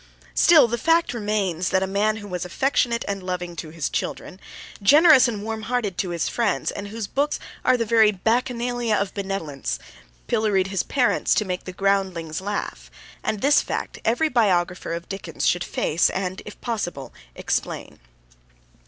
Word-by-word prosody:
Still, 310 -7 +6
the 235 +1 -2
fact 330 +1 +2
remains 205 -6 -1
that 190 - +2
a - - +1
man 205 +3 +1
who 205 -2 -8
was 180 -2 -4
affectionate 235 +4 0
and 200 -1 -3
loving 180 -1 -4
to 160 - -6
his 155 -2 -3
children, 185 - -4 0.4
generous 290 - +7
and 210 -4 -4
warm 220 0 -4
hearted 220 -4 -2
to 190 - -1
his 170 -2 -1
friends, 225 -6 0
and 205 - -6
whose 220 +1 -5
books 285 +8 -1 0.3
are 255 0 +4
the 230 - -1
very 220 -1 +5
bacchanalia 240 +2 0
of 200 -1 -1
benevolence, 165 - -3 0.5
pilloried 195 - +1
his 195 -1 0
parents 255 -3 +1
to 215 - +1
make 180 -1 -4
the 185 - -5
groundlings 185 -4 -1
laugh, 205 +1 -4 0.3
and 210 - -2
this 290 +2 +5
fact - - -4
every 245 +8 +2
biographer 180 - +1
of 170 0 -5
Dickens 195 0 -5
should 175 0 +2
face 165 +3 +1
and, 190 0 -3
if 210 - -10
possible, 175 - -4 0.2
explain. - - -3
205 Hz, 165 wpm, -23 LUFS, 180-235 Hz, 0.5 s, generous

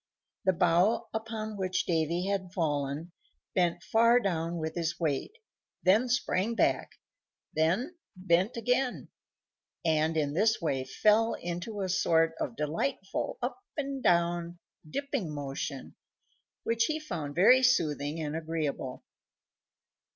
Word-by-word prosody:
The 190 - +4
bough 175 +5 +2
upon 220 -1 -4
which 185 -1 -1
Davy 170 +1 0
had 190 -2 -2
fallen 150 -1 -1 0.4
bent 175 -1 +1
far 230 +5 +5
down 170 -5 -1
with 160 -1 -3
his 165 -1 -2
weight, 160 - -2 0.5
then 215 +7 +4
sprang 230 -2 0
back, - - +1 0.6
then 195 - 0 0.2
bent 185 +4 +1
again, 250 +2 0 0.8
and 160 0 +2
in 145 -2 0
this 220 +6 +3
way 135 -5 -1
fell 215 +10 +3
into 175 +5 -5
a 190 - -1
sort 165 -3 +2
of 120 - -3
delightful 150 - -2
up 250 +9 -2 0.2
and 275 -2 -3
down 170 -1 +1 0.3
dipping 275 - -3
motion, 140 -1 -5 0.7
which 230 0 +2
he 310 +3 -1
found 165 - -5
very 230 +9 +6
soothing 155 - +2
and 155 -1 -3
agreeable. 155 -5 -3
175 Hz, 120 wpm, -30 LUFS, 160-220 Hz, 0.8 s, very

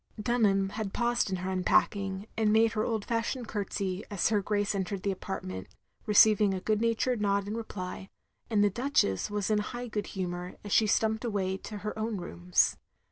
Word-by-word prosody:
Dunham 210 -4 +2
had 205 -1 -4
paused 240 -3 +1
in 190 - -1
her 185 +1 -3
unpacking, 190 +1 +1
and 220 -1 +2
made 225 +1 +4
her 215 -1 -1
old 220 -3 -1
fashioned 235 +1 -2
curtsey 200 -2 -3
as 205 -1 +1
her 210 -2 +2
Grace 205 0 0
entered 195 0 -3
the 200 - +1
apartment, 95 - -5 0.4
receiving 210 -1 +5
a - - -2
good 215 +3 0
natured 230 0 +1
nod 200 -1 +1
in 210 - -3
reply; 195 -4 -6 0.4
and 210 -3 +3
the 205 - +3
Duchess 225 - +1
was 205 0 -1
in 210 - +3
high 240 +4 -4
good 210 -3 -3
humour 180 -1 -4
as 205 - -7
she 220 - +4
stumped 220 +2 +1
away 200 -5 -1
to 210 +2 -8
her 210 +1 -5
own 220 -1 -2
rooms. 90 - +1
205 Hz, 190 wpm, -29 LUFS, 190-220 Hz, 0.4 s, receiving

